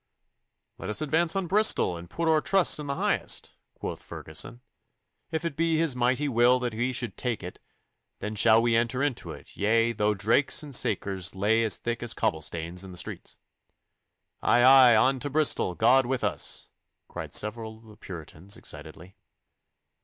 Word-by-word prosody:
'Let - - -6
us 105 - 0
advance 160 +3 +2
on 195 -1 -1
Bristol, 200 - +3
and 85 0 -10
put 170 - -3
oor 160 -1 +3
trust 195 -3 +3
in 150 - -6
the 140 - -2
Highest,' - - -1 0.2
quoth - - -6
Ferguson. 120 - -6 0.7
'If 160 +1 -3
it 160 -4 -3
be 165 0 +1
His 160 -5 +1
mighty 125 +4 0
will 120 0 +4
that 120 -2 -2
we 120 +4 -1
should 120 -5 -4
tak' 120 -5 -3
it, 90 - -8 0.6
then 105 - -5
shall 110 +1 +4
we 120 -1 +2
enter 120 +3 0
into 145 -4 -3
it, - - -12
yea, 115 +3 +2
though 105 -1 0
drakes 115 +10 +1
and 145 -2 -9
sakers 95 -6 0
lay 110 +4 +2
as 105 -7 +1
thick 120 0 -4
as 120 -1 -1
cobblestanes 85 +3 -2
in 95 - -10
the 90 - -10
streets.' - - -6 1.0
'Aye! 120 - +3
aye! 130 -2 +8
On 130 +4 +3
to 145 - -3
Bristol! 145 - +1
God 125 +3 +4
with 130 0 -2
us!' - - -2 0.4
cried - - -8
several 110 +1 -1
of 110 - -21
the 110 -1 -15
Puritans 90 -1 -7
excitedly. 80 +5 -10
120 Hz, 175 wpm, -27 LUFS, 105-140 Hz, 1.0 s, aye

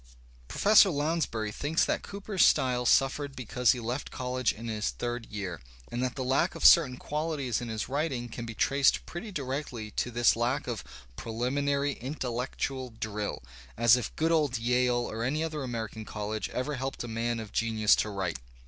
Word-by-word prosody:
Professor 205 - +6
Lounsbury 145 - -1
thinks 145 +9 +1
that - - 0
Cooper's 200 -1 -1
style 125 -2 +3
suffered 135 +2 +2
because 125 0 +2
he 125 - -5
left 120 +4 -3
college 125 -1 -1
in 115 +2 -8
his 110 -1 -1
third 120 -1 -4
year, 95 -5 -5 0.3
and 120 - -2
that 130 -1 -1
the 130 - -3
lack 135 +8 +1
of - - -3
certain 135 -7 +7
quaUties 150 -6 -2
in 120 - -5
his 110 -2 -3
writing 135 -3 -2
can 120 +1 -7
be 115 -1 -7
traced 140 +4 +3
pretty 190 +5 -7
directly 130 - -4
♦' - - -26
to - - 0
this 120 0 +3
lack 125 +4 0
of 120 -5 -4 0.3
"preUminary 140 - -1
intellectual 130 0 -3
drill" 105 - -3 0.2
— - - -19
as 120 0 +6
if 125 -4 -4
good 160 +1 +1
■ - - +4
old 145 -6 +2
Yale 120 +1 +1
or 110 +1 -4
any 150 +6 0
other 155 -2 -3
American 115 -3 -4
college 105 0 -4
ever 135 +4 -2
helped 135 0 -4
a - - -5
man 115 +1 -2
of 110 -2 -7
genius 110 -2 +3
to 105 - -1
write! 95 -8 -3
125 Hz, 185 wpm, -29 LUFS, 115-140 Hz, 0.3 s, certain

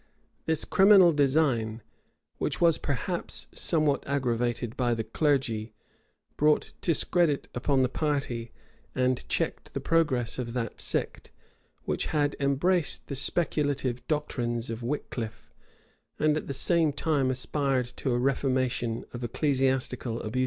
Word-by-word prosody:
[] - - -42
This 160 -2 +1
criminal 190 -3 +6
design, 130 -7 +1 0.6
which - - -1
was 170 -2 +4
perhaps 170 +6 -1
somewhat 155 -4 +1
aggravated 120 -4 -1
by 120 -2 +1
the 115 - -2
clergy, 115 -3 0 0.6
brought 150 0 +2
discredit 170 -2 +1
upon 130 +2 +1
the - - +3
party, 130 -5 -2 0.4
and 130 -1 +1
checked - - -2
the - - 0
progress 135 -9 +1
of 120 -2 -4
that 120 -3 -3
sect, - - 0 0.6
which - - -1
had 145 -2 0
embraced 145 +5 +1
the 140 - -3
speculative 140 -4 0
doctrines 120 -6 -2
of 115 +1 -5
Wickliffe, 115 -3 -5 0.7
and 150 0 +2
at 155 - -4
the 140 - -4
same 165 +2 +3
time 140 -2 0
aspired 130 0 0
to 130 - -1
a 120 - +1
reformation 130 -3 0
of 120 0 -6
ecclesiastical 130 -2 0
abuses. 110 +4 -3
135 Hz, 130 wpm, -28 LUFS, 120-150 Hz, 0.7 s, criminal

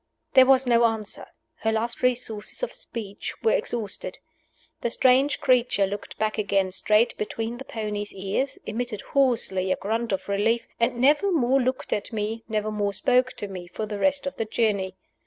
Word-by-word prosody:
There 260 -1 +8
was 265 0 +5
no 235 -1 +4
answer. 220 -3 -2 0.3
Her 220 - 0
last 225 +2 -2
resources 245 - -1
of - - -2
speech 205 -4 -7
were 455 - +4
exhausted. 220 - -2 0.6
The 235 - 0
strange 260 +4 +3
creature 250 -7 +3
looked 200 +1 -6
back 215 0 -1
again 195 -2 +1
straight 215 +5 +2
between 225 +2 -3
the 270 - -8
pony's 210 -2 -4
ears, 195 +8 -2
emitted 225 -1 -3
hoarsely 225 -9 +2
a - - +3
grunt 225 +3 -2
of 190 - -2
relief, 215 +4 +1
and 235 +1 +1
never 295 +10 +4
more 270 -4 +3
looked 255 +1 -1
at 205 - -3
me, 220 +1 -3
never 215 0 -1
more 205 -1 -1
spoke 255 +4 +2
to 205 - -5
me, 185 -3 -8
for 215 +4 -4
the 210 -1 -5
rest 280 +3 +2
of 275 - -4
the 225 - -1
journey. 205 -4 0
225 Hz, 175 wpm, -25 LUFS, 205-250 Hz, 0.6 s, There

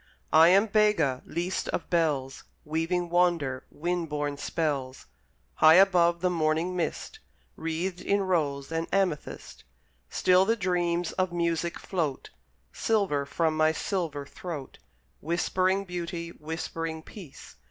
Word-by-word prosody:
I 160 +1 +8
am 195 +4 +5
Bega, 210 -12 +2
least 175 +2 -2
of - - -3
bells; 145 -6 0 0.2
Weaving 165 +3 -1
wonder, 170 -7 +1
wind 175 0 -3
born 145 -1 -2
spells. 140 -5 -3 0.5
High 155 +1 +7
above 175 -3 +4
the 180 - +2
morning 165 +2 0
mist, 180 - -3 0.4
Wreathed 165 +3 -3
in 200 0 +1
rose 150 -6 -1
and 165 0 -2
amethyst, 190 -7 -2 0.5
Still 185 0 +4
the 225 +4 +2
dreams 175 -4 0
of 185 -1 -1
music 170 0 -1
float 160 -8 -3 0.4
Silver 190 -11 0
from 160 +2 0
my 155 0 +3
silver 160 -6 -3
throat, 150 -2 -8 0.4
Whispering 185 +4 0
beauty, 170 -1 -5
whispering 160 0 -5
peace. 175 -8 -12
170 Hz, 120 wpm, -27 LUFS, 155-180 Hz, 0.5 s, I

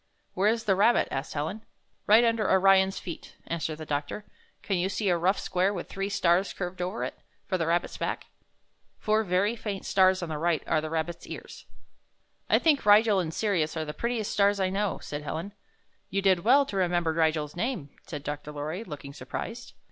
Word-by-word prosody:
''Where 200 +4 +3
is 230 0 -2
the 205 -4 +3
rabbit?" 225 +5 +4
asked 135 +3 -4
Helen. 160 +9 -3 0.5
''Right 220 +3 +7
under 225 -3 +1
Orion's 190 0 +4
feet," 170 - -8
answered 160 -2 -3
the 155 - -7
doctor. 145 +8 -3 0.4
"Can 195 - 0
you 185 +2 0
see 200 0 -1
a 175 - +3
rough 180 +4 +2
square 185 +2 0
with 180 -4 -5
three 195 0 -3
stars 185 -1 +2
curved 180 -1 -5
over 185 +5 -2
it, - - -5 0.3
for 185 - -1
the 165 - 0
rabbit's 170 +1 0
back? - - -3 0.7
Four 215 +1 +1
very 200 +4 +1
faint 205 -4 -5
stars 185 -1 +3
on 170 - -4
the 155 -1 -3
right 170 0 +1
are 155 - +1
the 155 - -4
rabbit's 165 +1 -3
ears." - - -9 0.8
"I - - +6
think 305 -4 +3
Rigel 210 0 +6
and 165 -3 -2
Sirius 170 -5 0
are 160 - -2
the 150 - -5
prettiest 235 0 -2
stars 200 0 +3
I 185 -1 +1
know," 200 +1 -1
said 145 0 -5
Helen. 165 +6 -5 0.6
"You 195 0 -1
did 190 -2 +4
well 275 +6 +5
to 200 - -5
remember 175 -3 +1
Rigel's 155 -2 0
name," 180 - -3 0.2
said 150 -4 -6
Dr. 145 +1 -5
Lorry, 155 +7 -4
looking 145 -7 -8
surprised. - - -6
185 Hz, 195 wpm, -28 LUFS, 160-205 Hz, 0.8 s, Right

